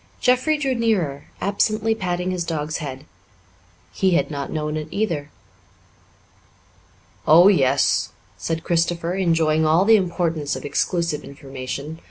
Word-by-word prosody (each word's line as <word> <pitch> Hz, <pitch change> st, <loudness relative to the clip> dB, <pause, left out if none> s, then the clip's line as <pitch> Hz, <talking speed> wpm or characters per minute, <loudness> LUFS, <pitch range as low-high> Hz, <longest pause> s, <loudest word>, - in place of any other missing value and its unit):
Jeffrey 255 Hz, +5 st, +2 dB
drew 275 Hz, -3 st, 0 dB
nearer, 200 Hz, -, 0 dB, 0.2 s
absently 215 Hz, +2 st, +1 dB
patting 180 Hz, -3 st, -2 dB
his 180 Hz, -2 st, -2 dB
dog's 155 Hz, -2 st, -3 dB
head. 140 Hz, -3 st, -7 dB, 0.9 s
He 190 Hz, -2 st, +2 dB
had -, -, +1 dB
not 140 Hz, -2 st, -4 dB
known 150 Hz, -1 st, -2 dB
it 155 Hz, -1 st, -4 dB
either. 165 Hz, -9 st, -2 dB, 2.0 s
"Oh, 170 Hz, +5 st, +8 dB
yes," 140 Hz, -8 st, +2 dB, 0.3 s
said 165 Hz, 0 st, -3 dB
Christopher, 170 Hz, 0 st, 0 dB
enjoying 165 Hz, -4 st, +2 dB
all 160 Hz, +4 st, +3 dB
the 225 Hz, +1 st, +7 dB
importance 170 Hz, -5 st, -1 dB
of -, -, -7 dB
exclusive 170 Hz, 0 st, -1 dB
information. 140 Hz, +3 st, -7 dB
165 Hz, 125 wpm, -22 LUFS, 150-190 Hz, 2.0 s, Oh